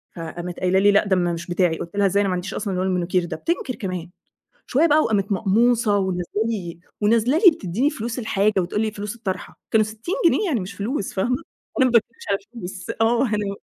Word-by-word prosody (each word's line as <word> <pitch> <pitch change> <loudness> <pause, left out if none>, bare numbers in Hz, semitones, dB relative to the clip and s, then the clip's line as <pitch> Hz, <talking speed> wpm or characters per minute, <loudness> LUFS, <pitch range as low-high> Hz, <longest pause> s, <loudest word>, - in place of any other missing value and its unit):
فقامت 175 +1 -6
قايلة 185 +1 +2
لي: 205 +1 +5
"لأ، 200 - +4
ده 195 -2 +2
م - - +2
مش 170 +1 -6
بتاعي." 175 -2 +1
قُلت 170 +4 -7
لها: 200 0 +3
"إزاي؟ 200 +1 +3
أنا 200 - +1
ما - - 0
عنديش 180 +2 -4
أصلًا 205 -2 -3
لون 185 +1 0
المانيكير 180 -1 0
ده." 170 - -5
بتنكر 275 - -2
كمان! 185 -4 -5 0.6
شوية 300 +6 +3
بقى 305 0 +5
وقامت 200 -2 0
مقموصة، 220 +2 +3
ونازلة 185 -2 -1 0.2
لي 180 -7 -4 0.2
ونازلة 230 +6 +3
لي 370 0 +8
بتدّيني 230 - -1
فلوس 235 -3 -4
الحاجة 215 -2 +1
وتقول 180 +4 -2
لي 220 -1 0
فلوس 210 +1 -5
الطرحة، 190 -8 -5
كانوا 220 -1 +4
60 220 - -4
جنيه، 425 - +4
يعني 280 -9 +1
مش 185 0 -6
فلوس 210 +1 -3
فاهمة، 235 +6 +1 0.4
أنا 260 - +6
ما 255 - +2
باتكلمش 230 0 +1
على 200 - +2
الفلوس. 195 -3 -9
آه، 235 +3 +3
أنا 210 -2 -2
205 Hz, 215 wpm, -22 LUFS, 185-230 Hz, 0.6 s, لي